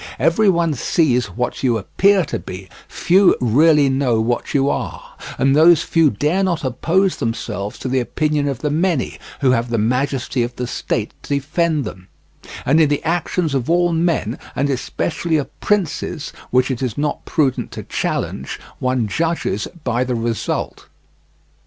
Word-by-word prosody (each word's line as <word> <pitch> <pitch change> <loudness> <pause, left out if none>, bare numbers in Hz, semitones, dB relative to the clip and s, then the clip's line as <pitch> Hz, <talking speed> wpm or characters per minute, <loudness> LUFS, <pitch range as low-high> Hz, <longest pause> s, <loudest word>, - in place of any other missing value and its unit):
Every 200 +6 +3
one 170 -3 +2
sees 125 -2 +1
what 125 0 -3
you 120 -4 +2
appear 190 - +2
to - - -4
be, 95 0 -9 0.2
few 190 +2 +4
really 145 +5 +4
know 130 -4 +1
what 120 +2 -1
you 135 0 +3
are, - - -4 0.2
and 135 +1 +3
those 160 +1 +6
few 165 -3 +3
dare 150 - 0
not 170 -4 0
oppose 165 +9 +1
themselves 105 -3 -3
to - - -5
the 130 +1 +1
opinion 150 +3 0
of 135 -4 -3
the 150 - 0
many, 165 -2 0 0.2
who 130 -2 +4
have 120 -1 0
the 115 - 0
majesty 125 +3 0
of 120 +1 -2
the 125 - -3
state 115 -2 -3
to 145 - -2
defend 155 +1 0
them; 95 -3 -8 0.6
and 150 +5 +4
in 155 - +4
the 145 - 0
actions 165 -1 -1
of 130 -1 -1
all 175 0 +3
men, 165 -9 0 0.2
and 140 +1 0
especially 160 +5 -1
of 145 - -5
princes, 180 -5 -1 0.2
which 130 +1 +2
it 130 - -3
is 125 -4 -2
not 150 0 -2
prudent 135 -5 0
to - - -6
challenge, 65 +1 -3 0.2
one 125 -3 0
judges 160 - -1 0.2
by 120 0 0
the 125 -1 -2
result. 115 -1 -3
140 Hz, 165 wpm, -19 LUFS, 120-165 Hz, 0.6 s, those